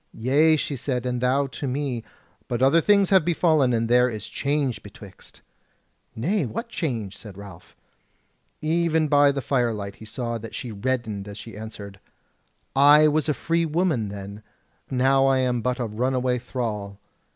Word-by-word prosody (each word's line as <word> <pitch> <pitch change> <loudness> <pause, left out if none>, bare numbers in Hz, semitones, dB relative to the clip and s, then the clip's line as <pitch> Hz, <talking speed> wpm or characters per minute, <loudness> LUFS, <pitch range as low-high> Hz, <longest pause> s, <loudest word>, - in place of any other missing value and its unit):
"Yea," 145 +7 +3
she 145 -1 -3
said, 125 -1 -3
"and 125 -1 -2
thou 130 +3 +2
to 135 +1 -6
me; 130 -3 -2 0.4
but 120 +1 -1
other 160 +5 +5
things 200 +1 +3
have 190 -4 +6
befallen, 155 -5 +2
and 115 -1 0
there 125 +1 +4
is 110 -3 -6
change 140 -3 -1
betwixt." 100 -1 -14 0.7
"Nay, 180 - 0
what 230 - -5
change?" 115 - -3
said 100 -2 -11
Ralph. 95 -4 -12 0.9
Even 160 0 +1
by 145 -1 +5
the 135 -1 -4
firelight 110 -7 -1
he 110 - -11
saw 115 +1 -4
that 115 +1 -9
she 120 - -5
reddened 110 -2 -3
as 100 0 -8
she 115 +2 -10
answered: 105 -2 -9 0.8
"I 145 +3 +7
was 155 +1 0
a 150 - +1
free 165 0 0
woman 155 - 0
then; 100 +1 -8 0.5
now 135 +1 +3
am 130 -2 +1
I - - -3
but 125 +1 -1
a 120 - -1
runaway 125 +3 0
thrall." 110 -5 -4
125 Hz, 160 wpm, -24 LUFS, 110-145 Hz, 0.9 s, I